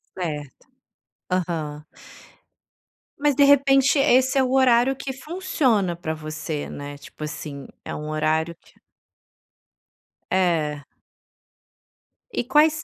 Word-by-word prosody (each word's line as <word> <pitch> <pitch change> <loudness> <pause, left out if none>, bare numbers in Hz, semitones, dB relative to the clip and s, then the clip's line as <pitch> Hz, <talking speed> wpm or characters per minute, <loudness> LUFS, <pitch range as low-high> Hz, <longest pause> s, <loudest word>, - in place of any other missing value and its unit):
Certo. 150 -7 -5 0.7
Aham. 160 -4 -2 1.3
Mas 290 -1 +2
de 285 - +5
repente 275 0 +5
esse 260 -1 +4
é 265 - +5
o 255 - -1
horário 260 0 +4
que 265 0 -5
funciona 260 - 0
pra 160 -2 -4
você, 155 -1 -5
né, 145 0 -7
tipo 145 +2 -11
assim, 150 -2 -6 0.2
é - - -5
um 150 0 -6
horário 160 +2 0
que - - -24 1.6
É. 160 -6 +1 1.5
E - - -1
quais 310 +3 +3
185 Hz, 110 wpm, -23 LUFS, -, 1.6 s, de